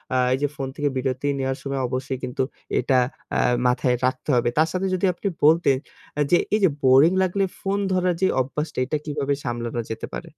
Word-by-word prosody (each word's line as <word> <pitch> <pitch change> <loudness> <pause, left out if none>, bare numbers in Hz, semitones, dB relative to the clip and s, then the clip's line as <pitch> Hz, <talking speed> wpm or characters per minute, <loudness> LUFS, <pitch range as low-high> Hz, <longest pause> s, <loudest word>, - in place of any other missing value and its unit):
আ - - +3 0.2
এই 130 - +1
যে 145 - +2
ফোন 135 -3 -4
থেকে 145 -1 0
বিরতি 130 +1 -2
নেওয়ার 135 0 -1
সময় 140 -1 -2
অবশ্যই 130 +1 -3
কিন্তু 125 +1 -1 0.4
এটা 130 - +2 0.4
আ - - +2 0.3
মাথায় 125 0 +2
রাখতে 130 +3 -2
হবে। 120 0 +2
তার 160 +1 +4
সাথে 190 +1 -1
যদি 185 +1 +1
আপনি 200 - -4 0.2
বলতেন 155 -3 +5 0.4
আ - - +3
যে, 175 - +7 0.2
এই 215 - +4
যে 190 - +6
বোরিং 135 +5 +6
লাগলে 195 +2 0 0.2
ফোন 200 +1 -1
ধরার 180 -1 +2
যে 190 - +4
অভ্যাসটা 145 +3 -4
এটা 150 - -1
কিভাবে 145 -2 -1
সামলানো 120 -1 -3
যেতে 110 - -4
পারে? - - -7
140 Hz, 200 wpm, -23 LUFS, 130-165 Hz, 0.4 s, যে